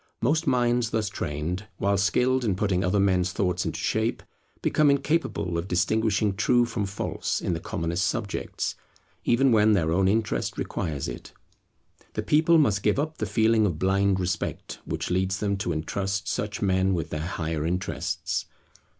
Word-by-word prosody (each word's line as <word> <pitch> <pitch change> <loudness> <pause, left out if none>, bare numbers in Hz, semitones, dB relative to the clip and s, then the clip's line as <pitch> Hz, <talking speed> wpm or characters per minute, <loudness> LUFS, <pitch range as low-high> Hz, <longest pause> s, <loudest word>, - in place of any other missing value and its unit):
Most 150 +7 +1
minds 120 -2 +2
thus 110 -3 -1
trained, 85 +2 -4
while 100 +1 +1
skilled 125 +7 +2
in 105 -5 +1
putting 95 -2 0
other 95 +2 +1
men's 95 -2 +2
thoughts 90 -2 0
into - - -3
shape, - - -1 0.4
become 150 -1 +3
incapable 140 - 0
of 85 - -5
distinguishing 105 +3 +1
true 120 +3 +3
from 105 -4 -2
false 100 +1 -2
in - - -1
the 80 - -2
commonest 85 +1 -1
subjects, 110 -5 -3 0.5
even 130 +2 +4
when 110 -1 +5
their 80 -5 +1
own 95 +3 +3
interest 110 +1 0
requires 75 -5 -3
it. - - -8 0.8
The - - -2
people 160 +2 +4
must 110 -10 +3
give 105 +4 +2
up 155 +2 -2
the 110 - -1
feeling 110 +1 +3
of 85 -5 -2
blind 95 +2 +2
respect 90 0 -3
which - - -3
leads 95 +1 +1
them 100 -1 0
to 95 -2 -2
intrust 95 +5 -2
such 105 0 -2
men 95 0 +2
with 80 -3 -3
their 75 - -2
higher 80 -3 -2
interests. 90 +4 -2
100 Hz, 165 wpm, -26 LUFS, 90-110 Hz, 0.8 s, when